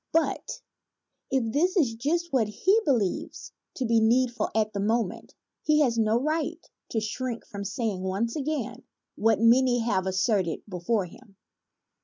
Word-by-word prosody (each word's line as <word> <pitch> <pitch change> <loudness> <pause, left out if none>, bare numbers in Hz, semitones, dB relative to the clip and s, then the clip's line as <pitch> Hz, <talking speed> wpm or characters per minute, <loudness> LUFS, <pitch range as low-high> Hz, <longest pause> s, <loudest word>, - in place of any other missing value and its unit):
But 325 0 -1 0.7
if 245 -4 0
this 360 +7 +2
is 265 -10 +3
just 330 +8 -1
what 235 -5 +3
he 380 - +2
believes 235 - -1 0.2
to 260 - -2
be 230 -1 +3
need 240 +3 +3
ful 235 -3 -2
at 215 0 +1
the 200 - -3
moment, 215 -1 -1 0.3
he 305 0 +3
has 250 -5 +2
no 220 +1 +3
right 310 +3 -1 0.3
to 225 - 0
shrink 235 +2 -4
from 200 -1 -7
saying 205 -1 -2
once 195 +5 -1
again 265 -5 -3 0.3
what 220 0 +2
many 245 +2 +5
have 190 -5 0
asserted 190 -2 0
before 190 +2 -1
him. 195 +3 -16
230 Hz, 155 wpm, -27 LUFS, 210-265 Hz, 0.7 s, many